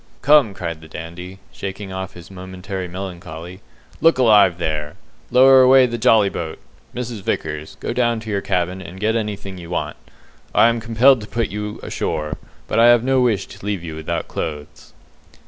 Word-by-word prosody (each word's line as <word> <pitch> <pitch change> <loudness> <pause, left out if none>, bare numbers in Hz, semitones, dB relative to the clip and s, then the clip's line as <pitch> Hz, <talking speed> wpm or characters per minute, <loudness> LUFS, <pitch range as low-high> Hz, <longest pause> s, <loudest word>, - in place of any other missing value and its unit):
"Come!" 135 -7 +5
cried 85 -4 -5
the 80 - -12
Dandy, 85 +4 -8
shaking 95 0 -6
off 95 0 -5
his 85 +1 -12
momentary 95 0 -6
melancholy, 90 -1 -8 0.4
"look 165 -4 +5
alive 105 -8 +5
there! 75 -3 -3 0.3
Lower 130 +1 +7
away 130 0 +7
the 120 -1 -3
jolly 110 -2 +5
boat. 85 -4 -5 0.4
Mrs. 120 -3 -5
Vickers, 75 -4 -4
go - - -3
down 120 -2 +1
to 110 -1 -6
your 100 -1 0
cabin 90 +1 -1
and 90 +1 -10
get 110 +2 +1
anything 100 -4 -4
you 85 -1 -10
want. 90 - -3 0.6
I 115 - +6
am 115 0 -1
compelled 115 +3 +4
to 105 - -8
put 115 +2 -2
you 105 +1 -5
ashore, 75 -1 -3 0.3
but 110 - 0
I 115 - +7
have 120 -1 +6
no 130 0 +2
wish 110 -6 +1
to - - -13
leave 100 -4 -3
you 80 -2 -6
without 80 0 -4
clothes." 75 -2 -6
100 Hz, 180 wpm, -20 LUFS, 85-115 Hz, 0.6 s, Lower